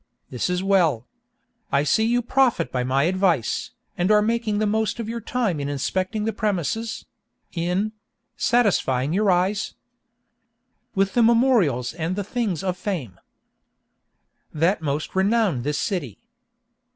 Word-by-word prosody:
This 125 Hz, +6 st, -2 dB
is 180 Hz, +1 st, -1 dB
well. 170 Hz, -, +2 dB, 0.7 s
I 140 Hz, +1 st, +3 dB
see 220 Hz, +9 st, +2 dB
you 240 Hz, +1 st, +1 dB
profit 250 Hz, -, +2 dB
by 125 Hz, -1 st, -1 dB
my 130 Hz, +2 st, +1 dB
advice, 180 Hz, -, +1 dB, 0.3 s
and 180 Hz, +2 st, 0 dB
are 210 Hz, -1 st, +5 dB
making 225 Hz, -1 st, 0 dB
the 215 Hz, -, +1 dB
most 220 Hz, +2 st, 0 dB
of 230 Hz, -, -4 dB
your 230 Hz, +1 st, -4 dB
time 220 Hz, -8 st, -1 dB
in 140 Hz, 0 st, -3 dB
inspecting 185 Hz, -, -2 dB
the 225 Hz, -, -1 dB
premises—in 200 Hz, -1 st, -3 dB, 0.4 s
—satisfying 160 Hz, -, +1 dB
your 205 Hz, +2 st, +2 dB
eyes 190 Hz, +3 st, +1 dB, 1.2 s
With 195 Hz, 0 st, +1 dB
the 240 Hz, -, +3 dB
memorials 225 Hz, -, +3 dB
and 165 Hz, +2 st, -3 dB
the 205 Hz, -, -2 dB
things 205 Hz, -5 st, -2 dB
of 185 Hz, -1 st, -1 dB
fame 170 Hz, -, -4 dB, 1.3 s
That 165 Hz, +5 st, +1 dB
most 150 Hz, 0 st, -3 dB
renown 195 Hz, -, +2 dB
this 145 Hz, +3 st, -2 dB
city. 155 Hz, -, -3 dB
190 Hz, 135 wpm, -23 LUFS, 155-220 Hz, 1.3 s, are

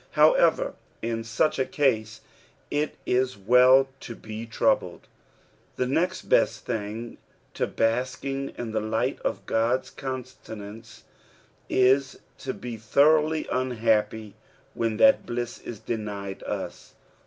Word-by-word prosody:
However^ -, -, +4 dB, 0.3 s
in 115 Hz, 0 st, -2 dB
such 115 Hz, +7 st, 0 dB
a -, -, +4 dB
case, 115 Hz, -9 st, 0 dB, 0.5 s
it 150 Hz, +1 st, -1 dB
is 130 Hz, -2 st, +1 dB
well 125 Hz, +6 st, +6 dB
to 115 Hz, -, -8 dB
be 110 Hz, +1 st, -7 dB
troubled. 115 Hz, -, 0 dB, 0.7 s
The 125 Hz, -, 0 dB
next 175 Hz, +8 st, 0 dB
best -, -, +2 dB
thing 115 Hz, 0 st, -4 dB, 0.3 s
to -, -, -1 dB
bftsking 130 Hz, +4 st, -1 dB
in 120 Hz, -2 st, -4 dB
the 110 Hz, 0 st, -1 dB
lisht 110 Hz, +1 st, -1 dB
of -, -, -3 dB
(^od's 115 Hz, +3 st, 0 dB
countenance, 115 Hz, -5 st, -8 dB, 0.7 s
ia 130 Hz, +2 st, +5 dB, 0.4 s
to 135 Hz, -, -3 dB
be 120 Hz, -2 st, -6 dB
thoroughly 155 Hz, +7 st, +3 dB
unhappy 110 Hz, -4 st, 0 dB, 0.4 s
when 115 Hz, -2 st, -1 dB
that 275 Hz, 0 st, +5 dB
blue 120 Hz, 0 st, -1 dB
is 120 Hz, -2 st, -9 dB
denied 105 Hz, -3 st, -5 dB
us. -, -, -6 dB
120 Hz, 120 wpm, -26 LUFS, 110-135 Hz, 0.7 s, well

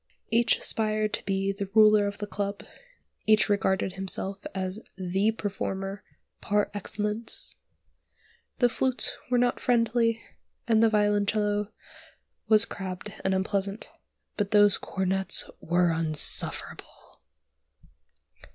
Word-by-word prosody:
Each 230 Hz, 0 st, +3 dB
aspired 215 Hz, -1 st, -1 dB
to -, -, -2 dB
be 195 Hz, 0 st, -1 dB
the 195 Hz, -1 st, -6 dB
ruler 215 Hz, -1 st, +6 dB
of 200 Hz, 0 st, -5 dB
the 205 Hz, -, -4 dB
club, 200 Hz, -1 st, -4 dB, 0.6 s
each 215 Hz, 0 st, +4 dB
regarded 190 Hz, -2 st, 0 dB
himself 195 Hz, +1 st, -1 dB
as 190 Hz, +1 st, -3 dB, 0.2 s
the 190 Hz, +3 st, 0 dB
performer 195 Hz, -2 st, -5 dB, 0.4 s
par 205 Hz, 0 st, 0 dB
excellence. 210 Hz, +2 st, -4 dB, 1.0 s
The 245 Hz, -, +4 dB
flutes 255 Hz, +1 st, +2 dB
were 250 Hz, -, +2 dB
not 245 Hz, 0 st, +1 dB
friendly, 230 Hz, -1 st, +1 dB, 0.5 s
and 225 Hz, -2 st, +3 dB
the 225 Hz, -, +5 dB
violoncello 210 Hz, 0 st, 0 dB, 0.8 s
was 215 Hz, 0 st, +6 dB
crabbed 190 Hz, +1 st, -6 dB
and 190 Hz, 0 st, +1 dB
unpleasant, 195 Hz, +2 st, -2 dB, 0.5 s
but 205 Hz, -2 st, -1 dB
those 205 Hz, -1 st, +5 dB
cornets 190 Hz, 0 st, 0 dB
were 175 Hz, 0 st, +1 dB
insufferable. 160 Hz, -2 st, 0 dB
205 Hz, 110 wpm, -27 LUFS, 195-215 Hz, 1.0 s, ruler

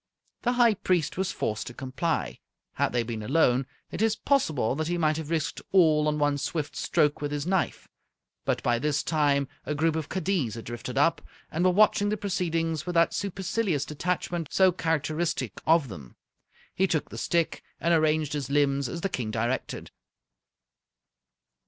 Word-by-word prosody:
The 245 Hz, -, +1 dB
High 240 Hz, -2 st, +5 dB
Priest 180 Hz, -6 st, 0 dB
was 190 Hz, 0 st, -1 dB
forced 110 Hz, 0 st, -3 dB
to 120 Hz, -, -8 dB
comply. 130 Hz, -, -2 dB, 0.3 s
Had -, -, 0 dB
they 120 Hz, -1 st, +1 dB
been 115 Hz, -1 st, -5 dB
alone, 130 Hz, +1 st, +2 dB, 0.2 s
it -, -, -4 dB
is 220 Hz, -1 st, +3 dB
possible 160 Hz, -, +1 dB
that 155 Hz, +1 st, -2 dB
he 175 Hz, +1 st, -1 dB
might 155 Hz, -2 st, +2 dB
have 160 Hz, -2 st, -5 dB
risked 165 Hz, -2 st, -1 dB
all 155 Hz, -5 st, +5 dB
on 150 Hz, 0 st, +1 dB
one 145 Hz, -1 st, +1 dB
swift 150 Hz, +1 st, -3 dB
stroke 150 Hz, -4 st, +1 dB
with 145 Hz, 0 st, -2 dB
his 145 Hz, 0 st, -2 dB
knife, 185 Hz, 0 st, -1 dB, 0.6 s
but -, -, -1 dB
by 120 Hz, -1 st, +2 dB
this 150 Hz, +2 st, 0 dB
time 145 Hz, -3 st, +2 dB, 0.2 s
a 150 Hz, -, -3 dB
group 160 Hz, +1 st, +1 dB
of 160 Hz, -3 st, -3 dB
kaddiz 180 Hz, -, -1 dB
had 115 Hz, -, -8 dB
drifted 120 Hz, +2 st, -6 dB
up, 165 Hz, +4 st, +3 dB, 0.3 s
and 165 Hz, +3 st, 0 dB
were 185 Hz, -, +5 dB
watching 205 Hz, +1 st, +4 dB
the 215 Hz, -, 0 dB
proceedings 165 Hz, -5 st, -1 dB
with 175 Hz, -, -3 dB
that 165 Hz, 0 st, +4 dB
supercilious 190 Hz, -5 st, -1 dB
detachment 170 Hz, +1 st, -2 dB
so 190 Hz, -1 st, +4 dB
characteristic 160 Hz, -, -1 dB
of 160 Hz, -3 st, +4 dB
them. 75 Hz, -, -10 dB, 0.6 s
He 190 Hz, -, +2 dB
took 160 Hz, -4 st, -1 dB
the -, -, -8 dB
stick 170 Hz, -2 st, 0 dB, 0.2 s
and 170 Hz, -, +2 dB
arranged 155 Hz, -2 st, +2 dB
his 140 Hz, -3 st, -3 dB
limbs 140 Hz, -2 st, +2 dB
as 170 Hz, -, -5 dB
the 195 Hz, -, +1 dB
King 125 Hz, -10 st, -3 dB
directed. 115 Hz, +4 st, -2 dB
155 Hz, 175 wpm, -27 LUFS, 140-175 Hz, 0.6 s, High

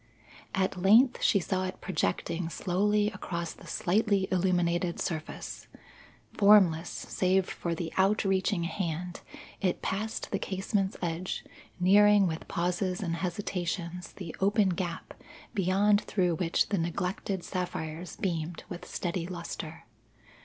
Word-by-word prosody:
At 190 Hz, -1 st, 0 dB
length 230 Hz, +7 st, +5 dB
she 200 Hz, -, +4 dB
saw 185 Hz, +1 st, -1 dB
it 185 Hz, -, -5 dB
projecting 165 Hz, -1 st, -1 dB
slowly 205 Hz, +5 st, +1 dB
across 170 Hz, -4 st, -4 dB
the -, -, -15 dB
slightly 200 Hz, 0 st, +1 dB
illuminated 175 Hz, -1 st, +1 dB
surface. 155 Hz, -2 st, -4 dB, 0.7 s
Formless, 190 Hz, -5 st, +5 dB
save 185 Hz, 0 st, 0 dB
for 170 Hz, -1 st, -3 dB
the 165 Hz, -1 st, -4 dB
outreaching 195 Hz, -1 st, +2 dB
hand, 175 Hz, 0 st, -3 dB, 0.4 s
it 185 Hz, -3 st, 0 dB
passed 215 Hz, +3 st, -3 dB
the 195 Hz, -, 0 dB
casement's 195 Hz, +1 st, -1 dB
edge, 170 Hz, +2 st, -3 dB, 0.3 s
nearing 205 Hz, +2 st, +6 dB
with 160 Hz, -2 st, -3 dB
pauses 180 Hz, +2 st, -1 dB
and 170 Hz, -2 st, -1 dB
hesitations 180 Hz, -1 st, -3 dB
the 175 Hz, -5 st, -7 dB
open 200 Hz, +1 st, +3 dB
gap 175 Hz, -2 st, -3 dB, 0.4 s
beyond 200 Hz, +1 st, +3 dB
through 180 Hz, -4 st, +1 dB
which 165 Hz, +1 st, +1 dB
the 200 Hz, -, +1 dB
neglected 180 Hz, +3 st, -2 dB
sapphires 175 Hz, -2 st, -4 dB
beamed 165 Hz, -3 st, -3 dB
with 175 Hz, -, -7 dB
steady 175 Hz, -1 st, -3 dB
lustre. 170 Hz, -2 st, -6 dB
185 Hz, 120 wpm, -29 LUFS, 170-195 Hz, 0.7 s, nearing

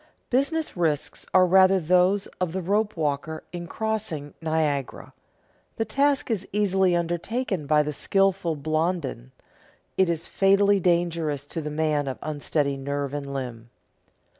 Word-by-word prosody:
Business 295 Hz, +5 st, 0 dB
risks 160 Hz, -5 st, -1 dB
are 185 Hz, -1 st, +6 dB
rather 190 Hz, +1 st, +5 dB
those 180 Hz, +4 st, +3 dB
of 180 Hz, -3 st, -1 dB
the 190 Hz, -, -2 dB
rope 205 Hz, +2 st, 0 dB
walker 155 Hz, +1 st, -2 dB
in 175 Hz, -1 st, -5 dB
crossing 210 Hz, -10 st, -3 dB
Niagara; 155 Hz, -4 st, -2 dB, 0.6 s
the 225 Hz, -, -1 dB
task 275 Hz, +3 st, +1 dB
is 200 Hz, -4 st, -2 dB
easily 190 Hz, -3 st, +2 dB
undertaken 175 Hz, -, -2 dB
by 150 Hz, 0 st, +4 dB
the 150 Hz, 0 st, -3 dB
skilful 195 Hz, -1 st, +1 dB
Blondin, 155 Hz, -, -2 dB, 0.7 s
it 190 Hz, -2 st, +3 dB
is 165 Hz, -1 st, -2 dB
fatally 200 Hz, +1 st, +3 dB
dangerous 170 Hz, -5 st, 0 dB
to 160 Hz, +3 st, -5 dB
the 150 Hz, -, -4 dB
man 150 Hz, -1 st, 0 dB
of 130 Hz, -, -3 dB
unsteady 145 Hz, -2 st, -1 dB
nerve 140 Hz, 0 st, -3 dB
and 140 Hz, -1 st, -4 dB
limb. 120 Hz, -4 st, -6 dB
170 Hz, 140 wpm, -25 LUFS, 150-195 Hz, 0.7 s, are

